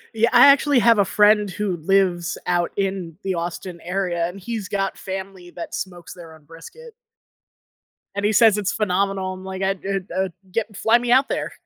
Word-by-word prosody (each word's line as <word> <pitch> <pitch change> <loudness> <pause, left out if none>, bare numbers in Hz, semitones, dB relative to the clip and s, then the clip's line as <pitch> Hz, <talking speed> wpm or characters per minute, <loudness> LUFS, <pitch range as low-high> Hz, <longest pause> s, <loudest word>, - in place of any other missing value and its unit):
Yeah, 225 +1 +3
I - - +8
actually 280 0 +5
have 230 -2 +4
a 200 - +4
friend 210 +1 +3
who 190 +1 -3
lives 180 +1 +1
out 175 -1 0
in 190 -4 -3
the 190 - -1
Austin 170 0 -5
area, 175 -2 -2
and 180 +3 -9
he's 215 0 -5
got 195 -1 -2
family 190 -1 -7
that 175 - -8
smokes 175 -3 -6
their 165 -3 -12
own 155 - -20
brisket. 305 - -13 1.2
And 200 0 -2
he 210 - +3
says 220 -1 +5
it's 205 -2 -1
phenomenal. 195 -2 -1
I'm 185 0 -10
like, 190 0 -5
"I 190 - +2
I 190 -1 -3
I'd 185 - -9 0.2
get 215 0 -3
fly 225 +3 +4
me 240 0 -2
out 265 +2 +4
there. - - -3
195 Hz, 190 wpm, -22 LUFS, 180-210 Hz, 1.2 s, I